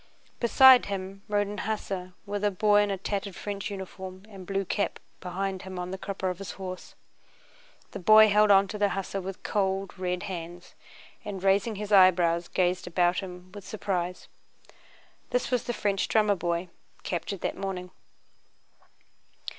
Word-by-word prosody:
Beside 255 +1 +7
him 195 0 -5
rode 205 -1 +1
an 205 +1 -6
hussar, 195 -4 -4
with 205 0 -4
a 205 - +4
boy 205 +2 +3
in 205 - 0
a 195 - -1
tattered 195 0 -4
French 200 0 -5
uniform 190 -1 -8
and 190 -3 -11
blue 195 0 -1
cap 200 +3 -1 0.2
behind 190 +1 -3
him 190 -1 -8
on 180 0 -4
the 190 - -4
crupper 195 -1 -4
of 180 - -8
his 195 - -6
horse. 185 -1 -8 1.0
The - - -6
boy 215 +3 +7
held 210 +1 +4
on 195 0 +6
to 210 - -5
the 205 -1 +3
hussar 195 0 -3
with 190 0 -7
cold, 195 -2 -1
red 180 -1 -2
hands, 175 -2 -7 0.5
and 200 -4 -6
raising 200 +3 +2
his 210 +1 -6
eyebrows 175 -3 +5
gazed 180 0 0
about 175 0 +2
him 180 -1 -9
with 205 +1 -10
surprise. 185 -3 -3 1.0
This - - -1
was 250 -2 0
the - - -1
French 200 -3 0
drummer 215 -2 +3
boy 170 0 -2 0.3
captured 180 +2 -4
that - - -2
morning. 185 -2 -5
195 Hz, 160 wpm, -27 LUFS, 180-205 Hz, 1.0 s, Beside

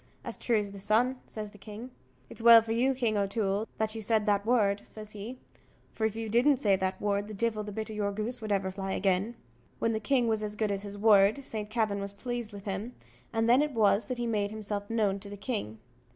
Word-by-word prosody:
"As - - -4
true 235 -2 +1
as 205 -1 -2
the 200 - -9
sun," 235 +6 +1
says 210 -1 -6
the 205 - -16
king. 220 +5 -9 0.4
"It's - - -10
well 230 -1 +9
for 225 - -5
you, 255 +4 +2
King 230 -4 0
O'Toole, 200 +1 0
that 220 0 0
you 225 - -5
said 215 0 +1
that 205 0 +1
word," 210 -5 +3
says 215 0 -10
he; 215 +5 -7 0.6
"for 220 - -1
if 220 - -6
you 225 0 -4
didn't 245 +6 +4
say 205 -5 +3
that 190 0 -2
word, 205 0 0
the 215 - -7
divil 220 0 0
the 210 - -6
bit 220 +2 -4
o' - - -6
your 205 -1 -1
goose 220 +4 0
would 215 -1 -4
ever 195 -1 0
fly 195 0 -4
agin." 195 +4 0 0.4
When 230 - +1
the 220 - -1
king 245 +2 +2
was 220 -1 +1
as 210 -1 -3
good 210 -1 0
as 195 -1 -2
his 205 0 -7
word, 210 +4 +5
Saint 215 -4 -5
Kavin 215 -3 0
was 200 0 -5
pleased 240 +1 -4
with 200 -1 -10
him, 205 +5 -4 0.4
and 225 0 +1
then 245 +4 +6
it 300 -1 -1
was 215 -2 +3
that 255 - -3
he 240 - -2
made 210 -3 0
himself 205 -1 -4
known 210 -4 +1
to 200 - -10
the 205 - -8
king. 195 - -4
215 Hz, 245 wpm, -29 LUFS, 200-230 Hz, 0.6 s, well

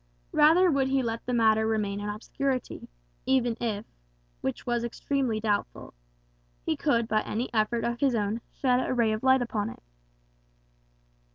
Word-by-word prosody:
Rather 330 +4 +5
would 275 -2 +2
he 265 0 +1
let 230 -1 -3
the - - -1
matter 220 -2 +3
remain 210 -2 -1
in 205 0 -4
obscurity, 255 +5 -3 0.4
even 250 -3 +2
if 220 -2 -2 0.6
(which 130 - -3
was 240 -1 0
extremely 235 -1 -1
doubtful) 210 -2 -2 0.7
he - - +1
could 235 -6 +1
by 215 -1 +2
any 235 +5 -4
effort 225 +1 +1
of 235 0 -2
his 270 -3 +2
own 215 +1 -1
shed 250 -2 +1
a - - -1
ray 230 -3 +2
of 215 0 -2
light 260 -1 +4
upon 220 -2 -2
it. - - -12
235 Hz, 160 wpm, -27 LUFS, 215-260 Hz, 0.7 s, Rather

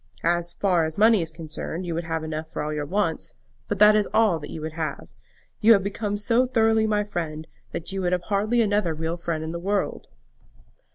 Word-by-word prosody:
As 175 0 +2
far 180 -4 +1
as 160 0 -3
money 220 -1 +5
is 160 -1 -4
concerned, 160 +2 -6
you 170 - -3
would 170 +1 -3
have 160 -1 -2
enough 155 0 -5
for - - -4
all 155 0 -3
your 150 -1 -3
wants; 180 -3 -1 0.3
but 205 - -2
that 210 +2 +7
is 210 -2 +2
all 215 -7 +4
that 150 - -8
you - - -6
would 155 +1 -5
have. 155 - -5 0.5
You 230 +2 +7
have 195 -3 +3
become 205 +1 -2
so 230 +5 +2
thoroughly 225 -2 +3
my 210 -1 +1
friend, 160 -6 -4 0.3
that 170 - -5
you 195 0 -3
have 180 -1 0
hardly 215 +5 +1
another 205 -6 +1
real 160 +2 -2
friend 170 -2 -3
in 160 - -4
the 170 - -4
world." 200 +3 -2
175 Hz, 215 wpm, -25 LUFS, 160-210 Hz, 0.5 s, that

